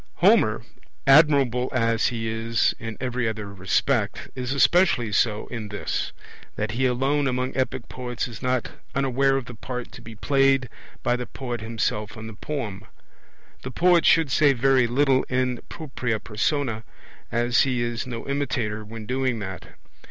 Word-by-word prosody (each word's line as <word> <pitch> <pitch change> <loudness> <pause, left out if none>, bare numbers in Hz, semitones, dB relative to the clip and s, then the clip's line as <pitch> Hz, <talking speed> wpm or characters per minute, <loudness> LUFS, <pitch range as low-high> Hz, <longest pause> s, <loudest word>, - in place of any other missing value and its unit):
Homer, 175 - +4 0.4
admirable 135 -4 +5
as 115 -3 +2
he 115 -2 -3
is 115 +1 +1
in 115 -1 -6
every 125 -2 -1
other 105 -2 -6
respect, 100 +3 0
is 125 0 -4
especially 140 - +3
so 105 0 +1
in 115 -4 -5
this, 105 - -3 0.4
that 105 0 -2
he 130 +4 +1
alone 135 +3 +1
among 130 0 -1
epic 130 -3 -2
poets 125 -1 -4
is 115 -4 -10
not 125 -1 -1 0.2
unaware 135 0 +2
of 135 - -4
the 120 - -9
part 125 +2 -6
to - - -11
be 115 0 -10
played 135 +1 +2 0.3
by 120 - +2
the 125 0 -4
poet 120 -4 -5
himself 110 -2 -2
in 110 - -7
the 110 - -7
poem. 105 -5 -5 0.8
The 130 - -6
poet 175 +5 +4
should 160 -4 +4
say 145 0 +5
very 130 0 +3
little 135 +2 +3
in 125 -1 0
propria 130 -7 -3
persona, 115 +1 -1 0.5
as 120 +1 +2
he 125 -3 +1
is 120 +1 -3
no 120 0 -6
imitator 125 -7 -2
when 110 +1 -8
doing 130 0 0
that. 95 -4 -7
125 Hz, 160 wpm, -24 LUFS, 115-135 Hz, 0.8 s, admirable